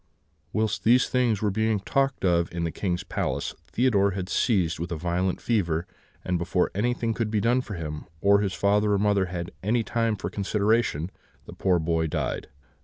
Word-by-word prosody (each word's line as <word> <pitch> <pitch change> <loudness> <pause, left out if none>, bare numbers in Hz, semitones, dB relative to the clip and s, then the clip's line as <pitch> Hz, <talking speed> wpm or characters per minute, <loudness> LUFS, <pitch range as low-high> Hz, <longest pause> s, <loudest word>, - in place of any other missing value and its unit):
"Whilst 110 0 -1
these 125 +3 +5
things 120 -5 +1
were 105 - +2
being 110 +1 +1
talked 135 +3 0
of 85 -2 +2
in 85 -1 -3
the 85 - -1
King's 90 -1 -2
palace, - - -2
Theodore 105 -5 +2
was 95 0 -4
seized 90 -9 +1
with 85 +1 -4
a - - -1
violent 90 +3 -1
fever, 85 -8 0 0.4
and 90 -1 0
before 90 +1 0
anything 115 +2 0
could 110 -1 -1
be 105 -1 +1
done 120 +4 +2
for 110 -5 -7
him, 75 -3 -5
or 100 +3 +5
his 100 -2 -1
father 105 +1 +2
or - - +3
mother 100 -1 +2
had 90 -1 -5
any 115 +4 +1
time 115 -1 0
for 90 -3 -5
consideration, 100 -4 0 0.3
the - - -10
poor 95 -2 +2
boy 80 0 0
died. - - -3
100 Hz, 185 wpm, -26 LUFS, 85-110 Hz, 0.4 s, these